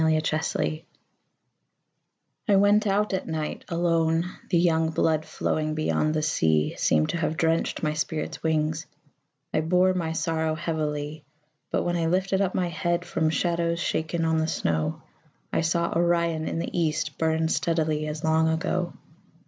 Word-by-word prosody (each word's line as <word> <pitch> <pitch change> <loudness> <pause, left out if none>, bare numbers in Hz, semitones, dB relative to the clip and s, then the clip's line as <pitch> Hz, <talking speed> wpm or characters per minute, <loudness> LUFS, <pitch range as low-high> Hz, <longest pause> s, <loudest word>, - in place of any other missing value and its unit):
Winter 155 0 +2
Stars - - -1 1.7
I 205 - +5
went 205 +2 +4
out 205 +1 +1
at 190 - -2
night 155 -1 -4
alone; 165 -1 +1 0.2
The 175 - +3
young 165 -2 +3
blood 160 -1 +1
flowing 155 0 -1
beyond 155 0 0
the 155 - 0
sea 80 - +2
Seemed 75 0 +2
to - - -1
have 160 -1 -1
drenched 165 +2 0
my 150 -1 +1
spirit's 155 0 -3
wings 160 0 0 0.7
I - - +2
bore 180 +3 +3
my 165 -3 -2
sorrow 160 -1 0
heavily. 155 -2 -3 0.5
But - - 0
when 175 0 0
I 165 -1 0
lifted 190 +3 +1
up 190 -2 0
my 180 -1 0
head 175 +1 -1
From 160 -2 0
shadows 170 +1 0
shaken 165 0 -1
on 160 0 +2
the 160 0 +1
snow, 80 - -1 0.5
I - - +2
saw 170 +1 0
Orion 170 -2 +1
in - - -2
the 165 - -4
east 155 -3 -1
Burn 160 0 +1
steadily 155 -2 0
as 150 +1 -5
long 160 0 +3
ago. 175 +2 -1
160 Hz, 155 wpm, -26 LUFS, 155-170 Hz, 1.7 s, I